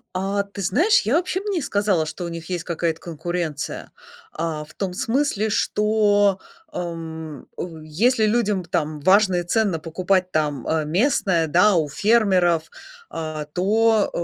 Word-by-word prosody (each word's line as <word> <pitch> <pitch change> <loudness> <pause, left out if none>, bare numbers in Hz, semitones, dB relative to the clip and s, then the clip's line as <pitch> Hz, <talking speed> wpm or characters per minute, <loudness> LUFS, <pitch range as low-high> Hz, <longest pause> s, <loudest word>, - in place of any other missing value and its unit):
А, 195 +2 0
ты 200 0 -9
знаешь, 310 - +3
я 220 +7 0
вообще 365 +1 -1
б 395 - -11
не 360 -4 -1
сказала, 200 - +1
что 180 - -6
у - - -4
них 165 0 -8
есть 175 -2 -2
какая-то 165 -1 -2
конкуренция. 170 -2 -4 0.4
А, 160 -1 -3
в 150 - -16
том 190 -2 -3
смысле, 225 0 0
что, 205 -2 +2 0.3
эм, 160 -4 -6
ой, 160 -3 -7
если 220 +9 +2
людям, 210 -4 +1
там, 155 -3 -2
важно 190 +3 +4
и 175 - 0
ценно 195 0 +1
покупать 180 +3 0
там, 150 -5 -1
э, 160 -1 0
местное, 180 - +1
да, 180 +6 +4
у 160 -3 +2
фермеров, 185 -3 +3 0.5
а, 155 -2 -4
то, 210 +7 +2
180 Hz, 150 wpm, -22 LUFS, 160-210 Hz, 0.5 s, важно